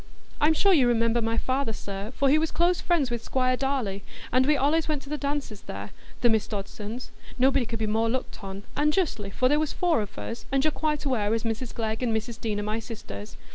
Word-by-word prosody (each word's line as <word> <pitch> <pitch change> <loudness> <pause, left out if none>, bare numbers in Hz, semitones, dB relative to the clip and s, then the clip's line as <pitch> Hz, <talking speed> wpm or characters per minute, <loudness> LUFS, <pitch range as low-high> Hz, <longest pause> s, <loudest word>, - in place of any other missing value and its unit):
I'm 310 +2 +4
sure 395 +4 +5
you 270 -7 +5
remember 230 0 +3
my 225 0 0
father, 260 -2 0
sir, 200 +1 -5
for 275 - +2
he 295 +3 +5
was 320 0 0
close 345 +1 +2
friends 320 -8 +1
with 235 -1 -2
Squire 255 -1 +1
Darleigh, 250 -8 -1 0.3
and 255 +2 +4
we 300 - +5
allays 300 +4 +2
went 300 -3 -1
to 275 - -12
the 300 - -1
dances 280 -7 -3
there, 100 +1 -7 0.3
the 240 - +5
Miss 220 -2 +1
Dodsons,—nobody 235 +5 -2
could 230 - -3
be 220 - -1
more 220 +2 +1
looked 250 -3 -3
on,—and 205 +10 -1
justly, 260 - 0
for 255 +6 +2
there 295 +3 +3
was 310 -1 -1
four 345 -9 +2
of 205 - -7
us, 230 - -6
and 270 0 +2
you're 310 - +3
quite 300 -1 -1
aware 225 -5 +1
as 225 - -2
Mrs 230 +1 -2
Glegg 220 0 -2
and 230 -3 +2
Mrs 225 +1 -6
Deane 215 -3 -1
are - - -2
my 215 +2 -1
sisters. 105 - -8
240 Hz, 225 wpm, -27 LUFS, 220-285 Hz, 0.3 s, sure